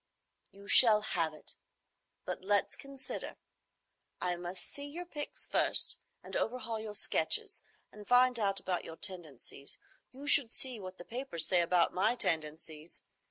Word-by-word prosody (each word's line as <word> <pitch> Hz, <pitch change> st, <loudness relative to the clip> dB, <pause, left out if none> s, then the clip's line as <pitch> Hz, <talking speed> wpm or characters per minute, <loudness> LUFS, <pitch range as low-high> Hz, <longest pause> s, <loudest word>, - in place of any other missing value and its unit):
"You 200 Hz, +1 st, -15 dB
shall 215 Hz, -3 st, +6 dB
have 170 Hz, -6 st, 0 dB
it. 155 Hz, -, -7 dB, 0.7 s
But -, -, -5 dB
let's 205 Hz, +1 st, +1 dB
consider. 270 Hz, -2 st, -6 dB, 0.8 s
I 180 Hz, -1 st, -1 dB
must 175 Hz, +1 st, -6 dB
see 285 Hz, 0 st, -7 dB
your 340 Hz, +5 st, -7 dB
pics 295 Hz, -4 st, -8 dB
first, -, -, +6 dB, 0.2 s
and -, -, -6 dB
overhaul 230 Hz, -2 st, -2 dB
your 215 Hz, -1 st, -6 dB
sketches, 420 Hz, -, +2 dB, 0.3 s
and 210 Hz, -1 st, -13 dB
find 250 Hz, 0 st, +4 dB
out 195 Hz, -2 st, 0 dB
about 180 Hz, -2 st, -3 dB
your 165 Hz, -, -9 dB
tendencies. 160 Hz, -6 st, -6 dB, 0.3 s
You 270 Hz, +3 st, -12 dB
should 285 Hz, -4 st, +5 dB
see 250 Hz, -1 st, -3 dB
what 185 Hz, -1 st, -9 dB
the 175 Hz, -, -11 dB
papers 240 Hz, -, -1 dB
say 180 Hz, -2 st, +3 dB
about 170 Hz, 0 st, +2 dB
my 215 Hz, +6 st, +2 dB
tendencies! 155 Hz, -3 st, -2 dB
205 Hz, 150 wpm, -32 LUFS, 175-255 Hz, 0.8 s, shall